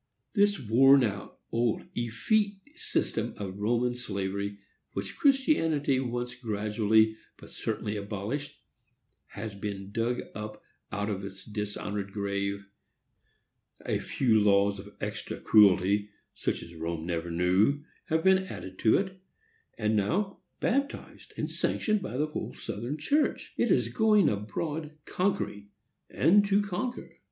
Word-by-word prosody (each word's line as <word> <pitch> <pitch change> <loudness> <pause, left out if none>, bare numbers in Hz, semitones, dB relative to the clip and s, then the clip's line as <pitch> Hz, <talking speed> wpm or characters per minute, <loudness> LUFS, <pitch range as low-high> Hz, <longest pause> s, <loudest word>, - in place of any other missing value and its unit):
This 205 -1 +3
worn 135 +4 +6
out, 100 -4 -3
old, 115 -1 +1
effete 200 - +1 0.2
system 360 - -1
of 100 -1 -6
Roman 120 +3 +1
slavery, 100 -3 -3 0.4
which 100 0 -4
Christianity 165 - +3
once 120 -1 -2
gradually 110 -1 +2 0.2
but - - -14
certainly 105 -1 -3
abolished, 105 +8 -4 0.7
has 110 -2 -5
been 100 -1 -5
dug 115 +3 -1
up 105 0 -7 0.3
out 105 +1 -1
of 100 -1 -3
its 95 -1 -8
dishonored 105 -1 -4
grave, 100 0 -2 1.2
a - - 0
few 115 -5 +2
laws 100 -1 +3
of 100 +1 -10
extra - - -4
cruelty, 100 0 +5 0.2
such - - -2
as 85 - -11
Rome 80 0 -4
never 85 0 -2
knew, 95 +12 +2 0.2
have 160 -1 0
been 190 0 +6
added 95 - -8
to 110 - +5
it, 190 -1 -3 0.6
and 110 -1 +1
now, 185 - 0 0.2
baptized 280 +4 -2
and - - -1
sanctioned 215 -2 0
by 125 - -4
the 150 - +2
whole 150 - -5
Southern 110 - -4
church, 290 - 0
it - - +1
is - - +3
going 215 -6 +4
abroad 150 +9 -3
conquering 180 - -1 0.4
and 205 +4 +5
to 200 +1 +3
conquer! 205 +6 -4
110 Hz, 130 wpm, -29 LUFS, 100-155 Hz, 1.2 s, worn